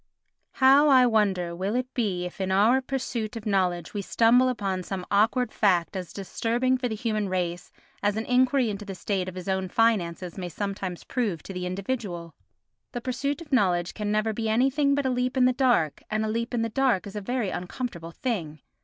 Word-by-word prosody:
How, 275 +3 +6
I 260 -2 +7
wonder, 195 -7 +1
will 195 +5 -2
it 255 +1 -2
be 195 -7 -1
if 180 +2 -7
in 190 0 -1
our 220 +7 +4
pursuit 245 -4 -3
of 225 - -7
knowledge 180 -5 0
we 205 - -2
stumble 235 +5 +4
upon 195 -6 -2
some 185 0 -5
awkward 220 +4 +2
fact 185 -4 +2
as 185 -3 -5
disturbing 235 +6 0
for 255 -1 -1
the 220 - -3
human 215 -2 -1
race 175 -1 -3 0.3
as 205 +1 +1
an 220 - -2
enquiry 250 -1 +3
into 205 0 -6
the 195 -2 -7
state 185 -1 -2
of 185 - -11
his 185 0 -7
own 190 -1 -1
finances 185 -5 0
may 180 -1 -4
sometimes 195 -1 -4
prove 215 -10 -2
to 195 - -8
the 180 -1 -3
individual? 185 -4 -4 0.6
The 245 - -4
pursuit 280 +5 -2
of 300 -4 -9
knowledge 180 -7 +2
can 210 -1 -3
never 215 +1 +1
be 225 0 -2
anything 270 +5 +2
but 285 -1 -1
a 260 - +2
leap 250 +1 -1
in 255 - +5
the 255 - +4
dark, 240 - +2
and 215 0 0
a - - -2
leap 230 +2 -2
in 230 - +1
the 230 - -1
dark 255 -5 +1
is 200 0 -9
a 210 - -3
very 230 -2 -2
uncomfortable 180 -2 -5
thing. 170 - -3
215 Hz, 205 wpm, -26 LUFS, 185-250 Hz, 0.6 s, I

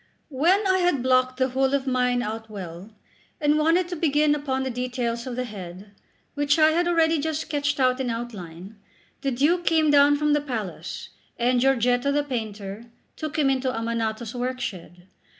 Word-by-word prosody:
2 280 - -12
When 365 +9 +3
I 375 -1 +3
had 350 -8 +1
blocked 255 0 +2
the 260 0 +1
whole 265 +2 +1
of 275 -1 -1
mine 250 -1 +1
out 220 +1 -5
well, 185 -1 -8 0.5
and 300 0 +2
wanted 335 +3 +3
to 355 - -3
begin 300 -2 +2
upon 270 -3 -2
the 265 - -2
details 245 -1 -3
of 250 - -4
the 255 - -2
head, 195 -3 -9 0.4
which 290 +1 +1
I 310 -1 +6
had 345 +2 +1
already 330 -2 +3
just 315 +1 -2
sketched 290 -1 -2
out 255 0 +2
in 260 -2 -1
outline, 205 -5 -7 0.4
the 275 - 0
Duke 295 +8 +1
came 320 -3 +3
down 290 0 +6
from 300 0 +1
the 295 - +2
palace, 225 -10 -5 0.3
and 245 +1 +2
Giorgetto, 250 0 +2
the 290 +1 +1
painter, 220 -5 -5 0.3
took 310 -1 -5
him 295 -3 +3
into 260 -1 0
Ammanato's 230 -1 -3
workshed. 245 -9 -5
260 Hz, 180 wpm, -24 LUFS, 230-295 Hz, 0.5 s, I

